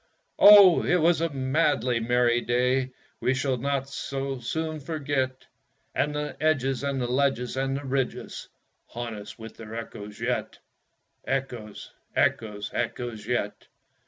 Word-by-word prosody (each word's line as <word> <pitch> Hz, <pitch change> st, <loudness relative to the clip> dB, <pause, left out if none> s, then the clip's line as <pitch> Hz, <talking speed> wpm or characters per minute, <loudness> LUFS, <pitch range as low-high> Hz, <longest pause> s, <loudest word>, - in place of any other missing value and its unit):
Oh, 200 Hz, -4 st, +9 dB
it -, -, +2 dB
was 170 Hz, -1 st, +3 dB
a 165 Hz, -, +1 dB
madly 130 Hz, -3 st, +1 dB
merry 120 Hz, +1 st, +2 dB
day 125 Hz, +2 st, +1 dB, 0.3 s
We 130 Hz, -, +1 dB
shall 135 Hz, -1 st, 0 dB
not 135 Hz, +1 st, -1 dB
so 135 Hz, -1 st, -4 dB
soon 155 Hz, +6 st, -3 dB
forget, 140 Hz, -4 st, -2 dB, 0.5 s
And 150 Hz, 0 st, 0 dB
the 150 Hz, -1 st, -3 dB
edges 135 Hz, -4 st, +1 dB
and 140 Hz, -1 st, -1 dB
the 125 Hz, -, 0 dB
ledges 125 Hz, -1 st, 0 dB
and 135 Hz, 0 st, -1 dB
the 145 Hz, -, -7 dB
ridges 135 Hz, -1 st, -3 dB, 0.4 s
Haunt 120 Hz, -1 st, -5 dB
us 105 Hz, -1 st, -9 dB
with 110 Hz, -1 st, -10 dB
their 115 Hz, 0 st, -8 dB
echoes 105 Hz, -2 st, -8 dB
yet -, -, -2 dB, 0.7 s
Echoes, 125 Hz, -6 st, -4 dB, 0.2 s
echoes, 105 Hz, -2 st, 0 dB
echoes 120 Hz, -2 st, -3 dB
yet! 120 Hz, -4 st, -2 dB
130 Hz, 135 wpm, -26 LUFS, 120-140 Hz, 0.7 s, Oh